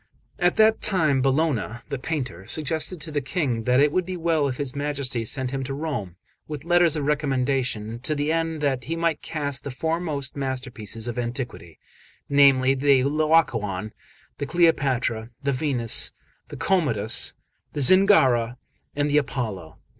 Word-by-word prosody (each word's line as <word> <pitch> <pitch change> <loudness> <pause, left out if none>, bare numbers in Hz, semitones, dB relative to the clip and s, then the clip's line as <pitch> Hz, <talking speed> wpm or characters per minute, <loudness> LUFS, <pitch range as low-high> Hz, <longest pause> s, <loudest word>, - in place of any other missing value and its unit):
XXXVII 185 - -1
AT 180 - 0
that 220 0 +4
time 155 -9 +2
Bologna, 135 -4 0
the 140 - -3
painter, 125 - -4
suggested 155 +6 -2
to 155 +1 -6
the 145 -1 -1
King 135 -6 -2
that 125 +1 +3
it 145 +1 +4
would 185 +3 +1
be 185 +1 -5
well 160 -3 +1
if 130 -2 -3
his 140 -2 -4
Majesty 140 -4 -2
sent 130 +2 -3
him 135 -1 -3
to 135 +1 -4
Rome, 135 - -4 0.3
with 150 -2 -6
letters 175 -2 +4
of 150 -2 -2
recommendation, 130 -6 -1
to 150 +5 -2
the 145 +2 0
end 165 -1 -1
that 135 -4 0
he 165 - -2
might 165 -2 0
cast 145 -3 -2
the - - -5
foremost 155 -1 -2
masterpieces 125 -5 -4
of 120 0 -3
antiquity, 120 - -5 0.5
namely, 135 -2 +5
the 135 -1 +3
Laocoon, 130 - +1 0.5
the 145 - -3
Cleopatra, 135 -9 +1
the 140 - +1
Venus, 130 -4 +1 0.3
the - - -9
Commodus, 120 - 0 0.4
the 145 - -2
Zingara, 130 - +5 0.4
and 145 0 +1
the 150 +1 +4
Apollo. 110 - -5
140 Hz, 160 wpm, -24 LUFS, 125-155 Hz, 0.5 s, namely